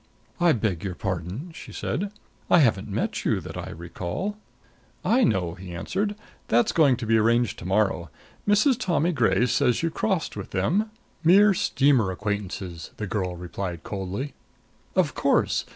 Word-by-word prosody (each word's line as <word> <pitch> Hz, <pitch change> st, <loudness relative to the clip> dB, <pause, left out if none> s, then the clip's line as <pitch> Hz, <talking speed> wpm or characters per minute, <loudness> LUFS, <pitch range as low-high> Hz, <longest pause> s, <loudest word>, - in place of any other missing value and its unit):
"I 175 Hz, -2 st, +5 dB
beg 100 Hz, -7 st, -1 dB
your 95 Hz, -3 st, -3 dB
pardon," 95 Hz, -, -4 dB
she -, -, -10 dB
said. 200 Hz, +2 st, -3 dB, 0.4 s
"I -, -, +6 dB
haven't 110 Hz, -, +3 dB
met 100 Hz, -, -2 dB
you, -, -, +1 dB
that -, -, -8 dB
I -, -, -5 dB
recall 85 Hz, -, -4 dB, 0.4 s
" -, -, -30 dB
"I 255 Hz, -, +4 dB
know," 95 Hz, -, +1 dB
he 90 Hz, -1 st, -9 dB
answered. 200 Hz, -, -2 dB, 0.3 s
"That's 120 Hz, +1 st, +3 dB
going 140 Hz, -7 st, +4 dB
to 115 Hz, -, -5 dB
be 110 Hz, 0 st, +4 dB
arranged 115 Hz, +1 st, +2 dB
to -, -, -9 dB
morrow. 95 Hz, -3 st, +1 dB, 0.4 s
Mrs. 220 Hz, +5 st, +4 dB
Tommy 175 Hz, -, +1 dB
Gray 125 Hz, -4 st, +3 dB
says 125 Hz, +2 st, +2 dB
you 165 Hz, -, +1 dB
crossed 190 Hz, -2 st, -1 dB
with 100 Hz, -, -6 dB
them 180 Hz, -, +1 dB, 0.2 s
" -, -, -36 dB
"Mere 195 Hz, +5 st, +7 dB
steamer 135 Hz, -, +3 dB
acquaintances," 95 Hz, -4 st, -4 dB
the 105 Hz, -, -3 dB
girl 90 Hz, -3 st, -2 dB
replied 90 Hz, 0 st, -5 dB
coldly. 100 Hz, +8 st, -4 dB, 0.6 s
"Of -, -, +2 dB
course! -, -, +2 dB
110 Hz, 165 wpm, -25 LUFS, -, 0.6 s, Mere